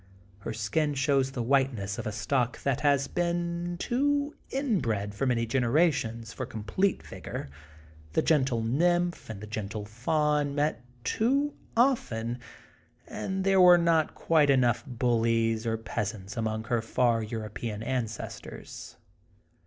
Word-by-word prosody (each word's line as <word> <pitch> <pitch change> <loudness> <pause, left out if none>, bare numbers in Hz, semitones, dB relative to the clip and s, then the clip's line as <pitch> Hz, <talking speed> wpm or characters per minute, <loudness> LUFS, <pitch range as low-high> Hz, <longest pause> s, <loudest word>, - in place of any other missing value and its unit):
Her 100 - -5
skin 130 +8 0
shows 135 -1 +2
the 125 - -2
whiteness 120 -6 +1
of - - -4
a - - -2
stock 120 +3 -1
that 140 0 0
has 140 -2 +3
been 175 0 -1
too 285 - 0
inbred 125 - -1
for 130 +6 -1
many 120 -2 +1
generations 120 -2 +1
f - - -15
pr 130 - -2
com 110 -2 -7
plete 190 - 0
vigor, - - -7 0.6
the - - +2
gentle 130 -7 +2
nymph 175 +8 +1
and 105 -3 -6
the - - -6
gentle 105 -1 -5
faun 145 +6 0
met 145 -4 0 0.2
too 275 - +1 0.2
often, 120 - +1 0.7
and 190 0 -3
there 195 -1 +4
were 180 -1 +9
not 165 -2 +2
quite 155 -3 +3
enough 120 -3 +3
bullies 115 -2 +1
or 115 0 0
peasants 105 -1 -4
among 110 -1 -2
her 120 0 0
far 115 0 +2
European 110 0 -5
ancestors. 115 -3 -5
125 Hz, 135 wpm, -28 LUFS, 115-165 Hz, 0.7 s, were